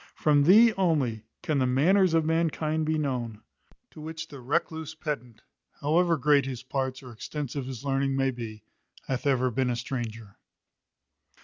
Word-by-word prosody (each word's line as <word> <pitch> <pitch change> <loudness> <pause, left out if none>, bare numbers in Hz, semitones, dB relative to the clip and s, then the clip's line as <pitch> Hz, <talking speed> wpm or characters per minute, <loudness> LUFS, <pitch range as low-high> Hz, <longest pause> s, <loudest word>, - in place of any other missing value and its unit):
From 145 -2 +3
thee 220 +6 +7
only 140 - +1 0.2
can 155 -5 0
the 130 - +2
manners 170 +7 +3
of 160 -1 +3
mankind 160 -1 0
be 155 0 +1
known; 120 -7 -3 0.5
to 155 - -12
which 160 +1 -6
the 140 -3 -10
recluse 160 +4 -2
pedant, 130 -8 -5 0.4
however 165 +3 +2
great 140 -1 +3
his 130 -2 -5
parts 130 0 -3
or 125 - -10
extensive 140 +3 -5
his 130 0 -7
learning 135 0 0
may 135 0 +1
be, 110 -4 -8 0.4
hath 130 +1 -2
ever 130 -2 +2
been 130 +1 0
a 120 - 0
stranger. 115 -4 -5
140 Hz, 155 wpm, -27 LUFS, 125-160 Hz, 0.5 s, thee